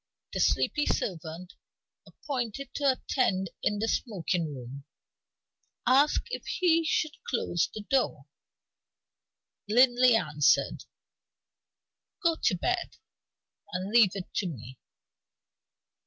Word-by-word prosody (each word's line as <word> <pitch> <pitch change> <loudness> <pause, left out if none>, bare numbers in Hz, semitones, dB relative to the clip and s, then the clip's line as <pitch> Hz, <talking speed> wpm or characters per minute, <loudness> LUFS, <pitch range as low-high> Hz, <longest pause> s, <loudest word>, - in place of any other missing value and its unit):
The - - -2
sleepy 295 - +2
servant, 175 +1 -3 0.5
appointed 265 -1 -5
to 285 -1 +1
attend 195 - -1
in 210 - 0
the 220 +2 -1
smoking 180 - -1
room, 135 +1 -9 1.0
asked 275 - +3
if - - -4
he 335 -3 +2
should 310 -1 0 0.2
close 175 -8 0
the 215 - -7
door. 200 - 0 1.4
Linley 245 +1 +5
answered: 150 -8 +2 1.4
"Go 335 -1 +3
to 185 - +2
bed, 365 - -2 0.8
and 185 +2 -3
leave 225 -5 +5
it 190 -2 -7
to 195 - 0
me." 130 -5 -9
215 Hz, 100 wpm, -28 LUFS, 170-265 Hz, 1.4 s, Linley